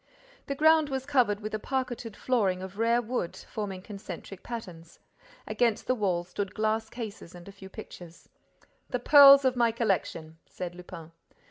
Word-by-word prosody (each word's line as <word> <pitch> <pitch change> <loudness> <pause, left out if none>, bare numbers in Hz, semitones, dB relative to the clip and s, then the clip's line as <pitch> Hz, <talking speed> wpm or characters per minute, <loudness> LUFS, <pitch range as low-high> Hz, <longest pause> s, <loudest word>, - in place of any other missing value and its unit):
The 280 - -2
ground 315 0 +4
was 265 -1 -3
covered 245 -7 +2
with 215 +1 -6
a 215 - -1
parqueted 245 -3 -4
flooring 195 -8 0
of 190 +2 -9
rare 235 +1 +2
wood, 230 -7 -3
forming 195 -4 -6
concentric 195 -2 -9
patterns. 180 -9 -9 0.5
Against 235 -3 0
the - - +2
walls 185 -6 -1
stood 200 0 -4
glass 220 +1 -1
cases 215 -7 -8
and 175 +1 -12
a - - -9
few 195 -1 -13
pictures. 175 -2 -12 0.6
"The 250 - -1
pearls 275 +2 +8
of 255 -1 +2
my 235 -2 +3
collection," 185 -8 -2
said 180 -1 -6
Lupin. 175 -2 -11
215 Hz, 160 wpm, -28 LUFS, 185-245 Hz, 0.6 s, pearls